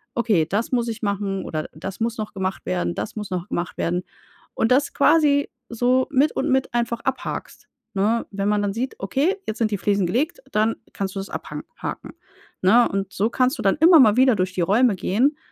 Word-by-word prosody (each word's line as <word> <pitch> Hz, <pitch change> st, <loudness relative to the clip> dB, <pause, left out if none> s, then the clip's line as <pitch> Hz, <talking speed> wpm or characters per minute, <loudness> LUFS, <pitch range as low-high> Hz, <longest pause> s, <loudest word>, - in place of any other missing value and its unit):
„Okay, 215 Hz, -9 st, +2 dB
das 205 Hz, +6 st, -1 dB
muss 240 Hz, -2 st, +1 dB
ich 225 Hz, 0 st, -5 dB
machen,“ 200 Hz, -1 st, -2 dB
oder 155 Hz, -1 st, -4 dB
„Das 190 Hz, +5 st, -7 dB
muss 230 Hz, 0 st, -1 dB
noch 215 Hz, -1 st, -5 dB
gemacht 190 Hz, -1 st, -3 dB
werden, 85 Hz, -1 st, -1 dB
das 105 Hz, -, -5 dB
muss 210 Hz, -1 st, -5 dB
noch 180 Hz, -1 st, -3 dB
gemacht 175 Hz, 0 st, -3 dB
werden.“ 175 Hz, +2 st, -1 dB, 0.5 s
Und 225 Hz, -, +1 dB
das 275 Hz, +3 st, +3 dB
quasi 285 Hz, -2 st, +3 dB, 0.2 s
so 250 Hz, +2 st, +2 dB
mit 285 Hz, +2 st, +3 dB
und -, -, -1 dB
mit 265 Hz, -2 st, +1 dB
einfach 235 Hz, -1 st, -1 dB
abhakst, 265 Hz, 0 st, -4 dB, 0.3 s
ne? 215 Hz, +4 st, +1 dB
Wenn 200 Hz, 0 st, -1 dB
man 210 Hz, 0 st, +2 dB
dann 200 Hz, -1 st, -1 dB
sieht: 250 Hz, +5 st, -3 dB
„Okay, 285 Hz, -, 0 dB
jetzt 220 Hz, -, -4 dB
sind 220 Hz, -2 st, +1 dB
die 205 Hz, -, 0 dB
Fliesen 200 Hz, 0 st, +1 dB
gelegt,“ 290 Hz, -, -1 dB
dann 215 Hz, +2 st, +1 dB, 0.2 s
kannst 195 Hz, -1 st, -4 dB
du -, -, -2 dB
das 195 Hz, -, -6 dB
abha -, -, -6 dB, 0.2 s
haken, -, -, -6 dB, 0.5 s
ne? 230 Hz, +6 st, +5 dB
Und 195 Hz, -1 st, -3 dB
so 210 Hz, +4 st, +1 dB
kannst 255 Hz, +4 st, +1 dB
du -, -, -3 dB
dann 195 Hz, +5 st, +2 dB
immer 330 Hz, +1 st, +7 dB
mal 220 Hz, -4 st, +6 dB
wieder 260 Hz, -2 st, +5 dB
durch 185 Hz, -1 st, -1 dB
die 185 Hz, -, -1 dB
Räume 210 Hz, +5 st, +3 dB
gehen. 250 Hz, -, +1 dB
215 Hz, 215 wpm, -22 LUFS, 195-255 Hz, 0.5 s, immer